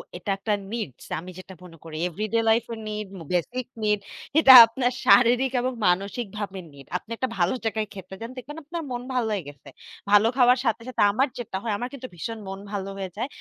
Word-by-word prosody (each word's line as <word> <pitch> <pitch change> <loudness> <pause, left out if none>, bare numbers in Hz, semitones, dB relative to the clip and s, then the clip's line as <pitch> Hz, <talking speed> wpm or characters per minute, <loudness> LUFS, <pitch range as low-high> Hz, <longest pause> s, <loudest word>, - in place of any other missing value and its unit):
এটা 180 +3 -7
একটা 210 +2 -1 0.2
নিডস। 220 - -5
আমি 185 +2 -9
যেটা 190 +1 -11
মনে 165 -2 -13
করি 160 -1 -9
এভরিডে 215 +6 -2
লাইফ 225 +1 +4
এর 225 - -7
নিড, 210 -1 -4 0.2
বেসিক 240 +8 -1 0.2
নিড 210 -1 +2 0.4
এটা 270 -4 +8
আপনার 245 +2 -1
শারীরিক 245 +2 +5
এবং 255 +1 -1
মানসিক 200 +6 0
ভাবে 195 -2 -5
নিড। 140 -1 -14
আপনি 225 - -16
একটা 260 - -1
ভালো 175 +4 +2
জায়গায় 220 -1 -1
খেতে 190 0 -9
যান। 230 - -5
দেখবেন 295 +5 -8
আপনার 335 +3 -5
মন 245 0 -3
ভালো 245 -3 0
হয়ে 195 -5 -2
গেছে। 140 -1 -14 0.4
ভালো 205 +2 +6
খাওয়ার 250 0 +6
সাথে, 230 0 0
সাথে 255 - -2
আমার 265 +7 +2
যেটা 225 -5 -4
হয় 225 - -2
আমার 245 +3 -4
কিন্তু 260 -2 -7
ভীষণ 225 +7 -5
মন 195 0 -6
ভালো 195 -1 -4
হয়ে 190 -1 -4
যায়। 245 - -2
220 Hz, 205 wpm, -25 LUFS, 190-245 Hz, 0.4 s, এটা